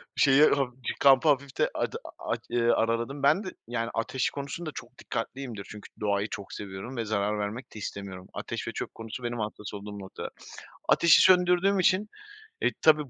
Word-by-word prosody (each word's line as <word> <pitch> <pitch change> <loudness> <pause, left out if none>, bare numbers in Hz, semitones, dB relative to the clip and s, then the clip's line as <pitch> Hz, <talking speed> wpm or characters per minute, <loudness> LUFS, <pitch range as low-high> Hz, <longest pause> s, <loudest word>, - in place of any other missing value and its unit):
Şeyi, 140 +1 +6
haf 135 -3 +2
cı - - -1
kampı 140 +2 +6
hafifte 140 -1 +1
ada - - -2
aaa, - - -10
aç - - -1
eee, 120 0 +1
araladım. 115 +5 +1
Ben 200 - +4
de, 185 - -6
yani, 115 -1 -2
ateş 125 +3 0
konusunda 145 +3 -5
çok 120 +1 -10
dikkatliyimdir. 120 -3 -5
Çünkü 105 -1 -10
doğayı 100 -1 +1
çok 100 -2 -6
seviyorum 100 +6 -7
ve 115 - -1
zarar 105 0 0
vermek 105 +5 -4
de 110 - -8
istemiyorum. 95 -2 -6
Ateş - - -5
ve - - -1
çöp - - -5
konusu 115 +2 -7
benim 120 0 -3
hassas 105 -1 -5
olduğum 105 0 -7
noktalar. 95 -1 -7 0.6
Ateşi 170 -2 +7
söndürdüğüm 180 +2 +5
için, 190 +3 +3 0.5
eee, - - +3
tabii 150 -3 +5
120 Hz, 180 wpm, -28 LUFS, 105-140 Hz, 0.6 s, Ateşi